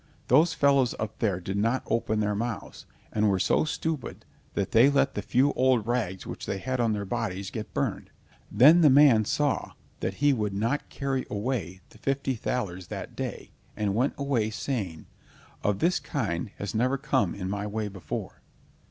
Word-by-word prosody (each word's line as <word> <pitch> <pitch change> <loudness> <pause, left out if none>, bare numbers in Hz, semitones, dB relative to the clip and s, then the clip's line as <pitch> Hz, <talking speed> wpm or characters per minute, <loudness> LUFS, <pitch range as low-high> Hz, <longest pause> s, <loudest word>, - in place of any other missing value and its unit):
Those 155 +8 +5
fellows 140 -3 +3
up 110 0 -5
there 100 -5 +1
did 95 +2 -4
not 115 +5 +1
open 110 -2 0
their 105 0 0
mouths, 115 +1 -5 0.3
and 105 0 +2
were 95 - +2
so 95 - +2
stupid 155 -3 -4 0.3
that 100 - -1
they 120 +5 +6
let 140 0 +2
the - - -3
few 135 +3 +2
old 130 -4 +2
rags 110 -6 -2
which - - -7
they 100 - -2
had 130 +5 -3
on 115 -2 +2
their 100 -1 -3
bodies 100 -3 -3
get 110 -2 -6
burned." - - -2 0.4
Then 145 - +7
the 155 - +7
man 130 -6 +6
saw 145 +6 0 0.3
that - - -2
he 145 0 +3
would 105 -5 -2
not 115 +8 -1
carry 135 -2 -2
away 100 -5 -3
the - - -18
fifty 135 -1 -1
thalers 95 -7 -3
that - - -7
day, - - -5 0.3
and 105 -2 0
went 125 +7 +1
away 135 -6 0
saying: 105 - -4 0.6
"One 105 - +2
of - - -10
this 175 +2 +3
kind 100 - -3
has 100 - -4
never 125 +5 +1
come 130 - 0
in 95 -2 -4
my 100 +1 -3
way 105 0 -2
before." 95 -3 -6
115 Hz, 185 wpm, -27 LUFS, 100-135 Hz, 0.6 s, Then